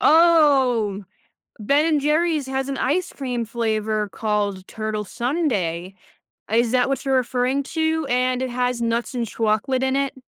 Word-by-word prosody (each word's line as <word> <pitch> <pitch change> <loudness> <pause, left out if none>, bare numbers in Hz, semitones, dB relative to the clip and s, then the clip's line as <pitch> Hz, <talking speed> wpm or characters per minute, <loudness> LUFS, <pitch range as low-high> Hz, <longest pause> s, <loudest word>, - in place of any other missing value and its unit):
Oh, 270 - +4 0.6
Ben& 295 +7 +2
Jerry's 305 -1 +1
has 265 0 -2
an 275 - -3
ice 345 +7 0
cream 250 -4 -3
flavor 215 -2 -1
called 205 -3 -2
Turtle 215 -1 -4
Sundae. 200 - -2 0.6
Is 230 +2 +2
that 250 0 +3
what 275 0 -2
you're 270 -1 +2
referring 255 +2 0
to, 320 +1 -1
and 255 +1 +1
it 260 - -2
has 250 0 -1
nuts 230 +2 -1
and 240 -2 -1
chocolate 225 +4 0
in 265 0 +1
it? 275 0 -1
250 Hz, 145 wpm, -22 LUFS, 220-280 Hz, 0.6 s, Oh